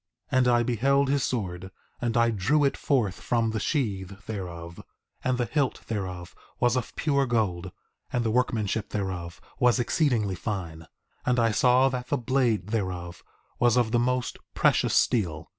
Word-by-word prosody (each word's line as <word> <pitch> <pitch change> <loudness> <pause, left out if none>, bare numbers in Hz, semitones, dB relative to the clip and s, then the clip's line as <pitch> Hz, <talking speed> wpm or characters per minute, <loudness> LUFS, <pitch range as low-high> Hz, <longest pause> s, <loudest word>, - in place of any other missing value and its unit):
4:9 130 - +2
And 125 - +3
I 120 -1 +4
beheld 135 +4 +2
his 140 -1 +1
sword, 95 -6 -3 0.3
and 120 -1 0
I 115 0 +4
drew 135 +9 +2
it 140 - +2
forth 115 -10 0
from 115 -2 +1
the 110 - -2
sheath 100 - -2
thereof; 85 -5 -6 0.4
and 130 -1 +1
the 120 - 0
hilt 145 0 -1
thereof 90 -5 -5 0.3
was 120 0 +3
of 125 -2 -3
pure 140 -3 +1
gold, 95 -7 -1 0.4
and 120 - 0
the 110 - +1
workmanship 110 -3 0
thereof 90 -4 -4 0.2
was 125 0 +4
exceedingly 120 - +1
fine, 85 -5 -5 0.4
and 125 0 +1
I 115 -1 +3
saw 125 +4 +4
that 125 -1 -4
the - - 0
blade 120 -5 0
thereof 90 -5 -3 0.4
was 120 0 +4
of 120 -3 +2
the 120 - +3
most 125 +1 -1 0.2
precious - - +3
steel. 85 -10 +1
115 Hz, 165 wpm, -27 LUFS, 95-125 Hz, 0.4 s, I